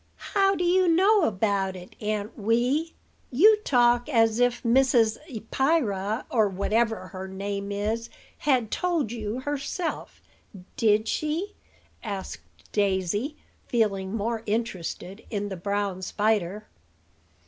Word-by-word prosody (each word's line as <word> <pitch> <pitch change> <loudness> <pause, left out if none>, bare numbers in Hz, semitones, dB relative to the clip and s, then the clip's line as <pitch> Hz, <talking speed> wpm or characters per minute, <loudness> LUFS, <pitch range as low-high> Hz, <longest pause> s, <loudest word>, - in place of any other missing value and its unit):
"How 390 -1 +4
do 355 - -1
you 365 +1 +3
know 380 +3 +4
about 195 -2 0
it, 180 0 -11
Aunt 210 0 -2
Wee? 245 +9 0 0.4
You 415 - +6
talk 245 - +3
as 225 -4 +3
if 245 0 +2
Mrs. 235 -2 +3
Eppyra 225 -4 0
or 220 -3 +3
whatever 210 0 0
her 190 +2 -7
name 200 +1 -4
is 215 +3 -2 0.3
had 255 -7 +1
told 340 - 0
you 225 +1 -4
herself. 290 +5 -4 0.6
Did 215 0 +3
she?" 325 - -2 0.5
asked 200 -4 -5 0.3
Daisy, 205 - 0 0.3
feeling 200 -4 0
more 225 +1 -2
interested 205 -2 -3
in 205 -2 -3
the 190 - -4
brown 200 +1 -2
spider. 210 0 0
225 Hz, 115 wpm, -26 LUFS, 200-265 Hz, 0.6 s, You